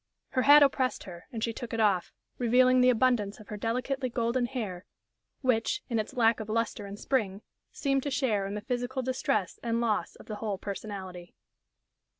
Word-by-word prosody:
Her 255 - +1
hat 290 +2 +8
oppressed 265 -2 +1
her 175 -2 -11
and 225 -2 -4
she 230 - 0
took 235 0 -7
it - - -3
off, 200 -5 +2 0.3
revealing 255 +1 +5
the 250 - +6
abundance 235 -4 +2
of 215 - -14
her 210 - -4
delicately 250 +5 -2
golden 235 +1 0
hair, 210 -9 -4 0.6
which, 255 - +1
in 230 - +1
its 215 +5 -4
lack 230 -2 +3
of 220 -1 -6
lustre 225 -2 -1
and 200 +1 -8
spring, 210 -6 -1 0.3
seemed 275 -2 0
to 285 - -3
share 225 -8 0
in 200 - -4
the 210 - -4
physical 245 +2 -2
distress 235 -6 -1
and 230 -1 0
loss 230 -3 0
of - - -14
the 215 - -6
whole 210 -3 -3
personality. 190 -3 -7
230 Hz, 185 wpm, -29 LUFS, 210-255 Hz, 0.6 s, hat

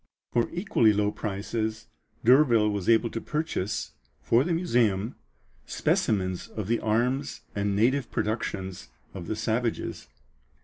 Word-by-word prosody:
For 120 -1 +2
equally 170 - +3
low 105 0 +1
prices 110 +2 -3 0.4
D'Urville 120 -4 +5
was 100 -1 -2
able 115 0 +4
to 115 - -4
purchase, 150 - -2 0.3
for 120 +3 +4
the 175 - -2
museum, 120 - +1 0.5
specimens 95 -3 0
of 110 -3 -5
the 115 +1 +1
arms 125 +6 0
and 100 -1 -1
native 125 +4 +2
productions 95 -4 -3 0.2
of 90 -4 -7
the 110 - -2
savages. 115 +2 -2
110 Hz, 125 wpm, -27 LUFS, 105-120 Hz, 0.5 s, D'Urville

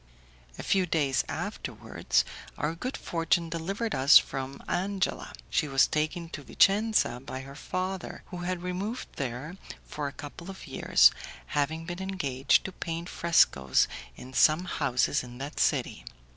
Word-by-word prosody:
A - - -6
few 190 -2 +2
days 140 -6 +1
afterwards - - -1 0.3
our 150 +2 -1
good 250 +11 -4
fortune 165 0 0
delivered 195 +7 -2
us 135 +3 +8
from 135 0 -2
Angela; 190 +1 -1 0.2
she 155 - +1
was 135 -1 +4
taken 155 +3 -1
to 145 - -7
Vicenza 200 - +3
by 130 -1 -6
her 135 +1 -10
father, 185 +5 -4
who 180 - -5
had 175 0 -3
removed 195 +7 -3
there 140 +7 -4 0.3
for 150 -1 -4
a - - -5
couple 160 +5 -9
of 190 - -9
years, - - +5 0.4
having 160 +3 0
been 175 +2 -5
engaged 145 -9 +1
to 190 - -4
paint 170 -1 -5
frescoes 70 - +3 0.3
in 130 +1 -11
some 155 +6 +4
houses 130 -7 +1
in 120 -1 -10
that 140 +3 -6
city. - - +1
165 Hz, 145 wpm, -28 LUFS, 140-185 Hz, 0.4 s, us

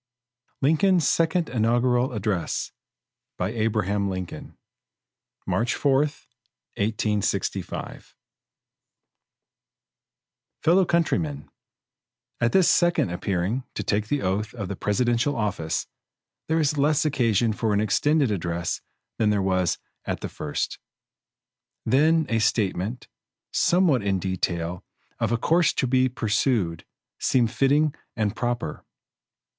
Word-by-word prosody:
Lincoln's 160 +3 +3
Second 165 0 +2
Inaugural 120 +2 +1
Address 105 -5 -2 0.7
March - - -1 2.3
4, 140 -2 +2
1865 105 - -3 2.5
Fellow 180 +3 +5
countrymen: 85 - 0 0.9
At 120 0 +2
this 190 -3 +4
second 175 - +3
appearing 95 +7 -1
to - - -3
take 105 0 0
the 145 +2 -1
oath 105 +4 -1
of 100 -5 -4
the 100 - -3
presidential 120 +7 +1
office, 100 -8 -2 0.6
there 160 +1 +1
is 150 -1 +1
less 150 +2 +3
occasion 120 -6 +2
for 110 +1 -1
an 100 - +2
extended 140 +6 +2
address 85 -3 -2 0.4
than 110 - +3
there 105 -1 +2
was 95 -2 +1 0.3
at - - -3
the - - -4
first. 75 -1 -4 1.1
Then 155 +7 +3
a 115 - +1
statement, 105 +2 -1 0.5
somewhat 175 -7 +3
in 100 -1 0
detail, 90 -2 -2 0.4
of 115 -1 0
a 120 - +2
course 165 +6 +3
to - - 0
be 130 +1 +3
pursued, 110 - 0 0.3
seemed 120 -3 +2
fitting 145 +3 +2 0.2
and 110 -2 -1
proper. 120 -10 -3
115 Hz, 105 wpm, -25 LUFS, 100-145 Hz, 2.5 s, Fellow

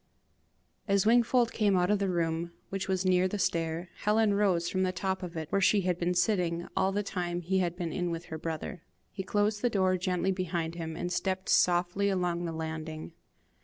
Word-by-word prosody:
As 200 0 +2
Wingfold 240 +1 +4
came 205 -4 +2
out 180 +2 +2
of 210 - +2
the 200 -1 0
room, 170 -1 -1 0.2
which 195 -1 -3
was 190 -1 0
near 185 0 +4
the 205 - -3
stair, 165 -1 -1
Helen 210 0 +2
rose 190 -4 +2
from 185 - -1
the 185 -1 +2
top 190 +1 -2
of 175 -2 -6
it, 160 -1 -5
where 195 - +2
she 200 +2 +4
had 180 -1 -1
been 175 +1 0
sitting 175 -2 +1
all 190 0 +2
the 205 +1 -1
time 175 -3 -3
he 190 +3 0
had 175 -2 0
been 175 0 -2
with 165 +1 -4
her 160 - -6
brother. 165 +2 -5 0.3
He 195 - -5
closed 205 +2 0
the 245 - +2
door 185 -3 +2
gently 185 0 0
behind 175 -3 -2
him, 165 -2 -5
and 175 +2 -3
stepped 185 +1 -2
softly 180 +3 +3
along 175 -2 0
the 165 - -3
landing. 160 0 -5
180 Hz, 200 wpm, -30 LUFS, 170-195 Hz, 0.3 s, Wingfold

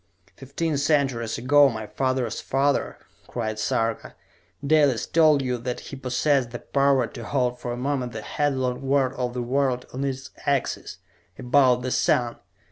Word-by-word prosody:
"Fifteen 145 +3 -3
centuries 135 -6 +1
ago, 140 +4 +5
my 110 -3 -5
father's 130 -1 -2
father," 140 +1 0 0.3
cried 110 -3 -4
Sarka, 115 +1 -1 0.5
"Dalis 145 -5 +3
told 155 -4 +4
you 125 -1 -2
that 125 +1 -4
he - - -9
possessed 130 0 0
the 120 - -6
power 140 -1 +2
to 115 0 -9
halt 125 +1 -1
for 120 - -4
a 120 - -4
moment 130 -1 -2
the 110 -1 -7
headlong 130 -3 -1
whirl 135 -1 +1
of 125 -2 -3
the 125 - -2
world 130 0 0
on 130 +2 -3
its 135 -1 -4
axis 140 -2 -1 0.4
about 125 -1 +3
the 130 - -2
sun! 120 -1 +1
130 Hz, 155 wpm, -24 LUFS, 120-140 Hz, 0.5 s, ago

